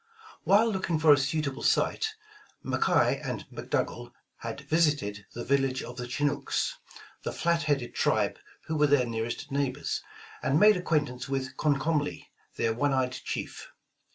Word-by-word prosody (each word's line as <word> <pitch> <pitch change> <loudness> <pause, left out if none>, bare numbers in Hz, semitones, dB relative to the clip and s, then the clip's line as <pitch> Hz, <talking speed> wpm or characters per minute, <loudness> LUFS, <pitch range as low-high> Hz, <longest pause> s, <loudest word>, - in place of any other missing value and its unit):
While 215 +4 +5
looking 185 -4 -1
for 155 -1 +7
a - - +4
suitable 140 0 -1
site, 440 -1 +1 0.5
McKay 455 - +2
and - - -4
Mc - - -8
Dougal - - -1 0.3
had - - -6
visited 145 -12 +1
the 120 - -4
village 135 -1 +1
of 120 - -8
the 125 -1 -4
Chinooks, 145 - -1 0.4
the - - -3
flat 170 -1 +1
headed 140 -5 0
tribe - - +1 0.3
who 160 - -2
were 150 -1 +4
their 140 -3 +4
nearest 115 +5 -4
neighbors, 140 0 -1 0.4
and 140 +3 +2
made 210 +2 +7
acquaintance 145 -7 -1
with 135 -1 -2
Comcomly, 145 0 0 0.3
their 115 - +1
one 140 +4 +1
eyed 130 -1 +1
chief. - - -6
145 Hz, 150 wpm, -28 LUFS, 130-160 Hz, 0.5 s, for